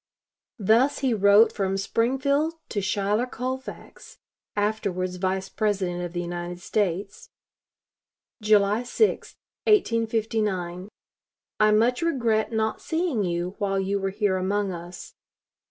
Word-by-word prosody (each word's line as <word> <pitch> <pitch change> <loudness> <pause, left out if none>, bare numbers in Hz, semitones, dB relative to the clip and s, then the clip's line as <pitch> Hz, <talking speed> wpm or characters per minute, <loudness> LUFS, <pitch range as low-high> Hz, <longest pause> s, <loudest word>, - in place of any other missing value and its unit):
Thus 230 +6 +3
he 255 - +2
wrote 205 +1 +5
from 195 -1 -1
Springfield 270 +9 0
to 205 - -2
Schuyler 205 +5 0
Colfax 255 +2 -7 0.4
(afterwards 200 -3 -1
Vice 190 +1 -1
President 190 -4 -1
of 175 -1 -5
the 175 - -2
United 175 0 -5
States), 200 +1 -2 1.1
July 210 +1 +3
6, 335 - 0 0.3
1859: 220 - 0 0.7
"I 215 0 +5
much 235 +6 +3
regret 235 -10 +1
not 220 -1 -1
seeing 320 - -1
you 175 0 -2
while 195 -1 0
you 195 +1 -1
were 195 0 -1
here 200 -1 0
among 195 +1 -1
us. 175 0 -9
205 Hz, 115 wpm, -25 LUFS, 190-230 Hz, 1.1 s, wrote